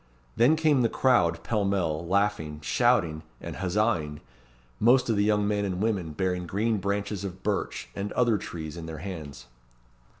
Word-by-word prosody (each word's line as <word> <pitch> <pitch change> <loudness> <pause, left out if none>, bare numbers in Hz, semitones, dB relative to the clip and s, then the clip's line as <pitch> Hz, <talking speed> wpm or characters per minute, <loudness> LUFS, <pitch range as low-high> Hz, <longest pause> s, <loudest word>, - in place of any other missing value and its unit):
Then 130 +7 +5
came 155 -4 +3
the 115 - +3
crowd, 85 -12 +2
pellmell, 95 -7 0
laughing, 95 -6 0
shouting, 90 -7 +2 0.2
and - - -7
huzzaing, 90 -6 0 0.6
most 120 +1 +4
of - - +1
the 100 - +2
young 105 -1 +2
men 105 -1 0
and 95 -2 -2
women 100 -7 -1
bearing 90 0 -1
green 110 +5 0
branches 100 0 -2
of 95 -1 -7
birch 100 -10 -2
and 100 +1 -4
other 120 -4 +2
trees 80 -2 -7
in 80 -1 -7
their 80 -1 -6
hands. 75 -10 -7
100 Hz, 160 wpm, -27 LUFS, 85-110 Hz, 0.6 s, Then